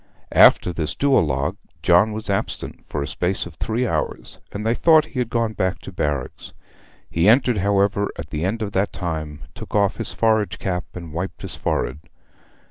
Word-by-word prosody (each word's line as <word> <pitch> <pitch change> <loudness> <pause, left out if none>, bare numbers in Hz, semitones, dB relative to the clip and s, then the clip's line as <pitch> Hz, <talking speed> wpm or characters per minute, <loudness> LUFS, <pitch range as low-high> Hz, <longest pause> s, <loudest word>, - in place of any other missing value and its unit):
After 90 - +6
this 80 -2 -2
duologue 75 - +1 0.3
John 90 +5 +5
was 110 +1 -5
absent 100 -1 -3
for 75 - -3
a - - -4
space 90 +6 -1
of 85 - -9
three 115 +10 -1
hours, - - -3
and 105 +2 -5
they 115 - +3
thought 160 +3 +5
he 140 - -6
had 120 -2 -1
gone 115 -2 0
back 95 -2 -1
to - - -9
barracks. 75 -7 -3 0.5
He 85 +5 +2
entered, 120 -2 +4
however, 100 +1 +2
at 80 -2 -7
the 75 +1 -2
end 110 +5 -1
of 105 - -4
that 100 +1 0
time, 80 -4 -4
took - - -8
off 100 -2 +2
his 115 - -2
forage 110 -5 +1
cap, 90 -1 -2
and 85 -4 -8
wiped 90 +4 -5
his - - -5
forehead. 65 +4 -2
95 Hz, 185 wpm, -22 LUFS, 85-110 Hz, 0.5 s, After